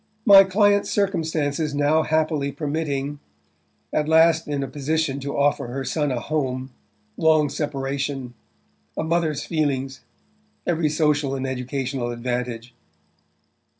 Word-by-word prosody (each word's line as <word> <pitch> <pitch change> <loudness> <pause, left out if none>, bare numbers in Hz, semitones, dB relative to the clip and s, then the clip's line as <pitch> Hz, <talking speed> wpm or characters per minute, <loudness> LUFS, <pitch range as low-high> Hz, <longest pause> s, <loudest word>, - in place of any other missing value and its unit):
"My 195 -2 +9
client's 205 +1 +2
circumstances 160 -6 -1
now 145 +2 +3
happily 155 -2 0
permitting... 145 -1 -3 0.7
at 150 0 0
last 160 0 +4
in 145 -2 -2
a - - -3
position 145 +1 -1
to 140 +1 -4
offer 140 -3 +1
her 135 +3 -4
son 145 +2 -1
a 125 - -1
home...long 130 +1 -1
separation...a 135 - -5
mother's 160 -2 0
feelings...every 150 +2 -3
social 150 -2 +1
and 135 0 -3
educational 130 -1 -3
advantage"... 120 0 -4
145 Hz, 105 wpm, -23 LUFS, 130-155 Hz, 0.7 s, My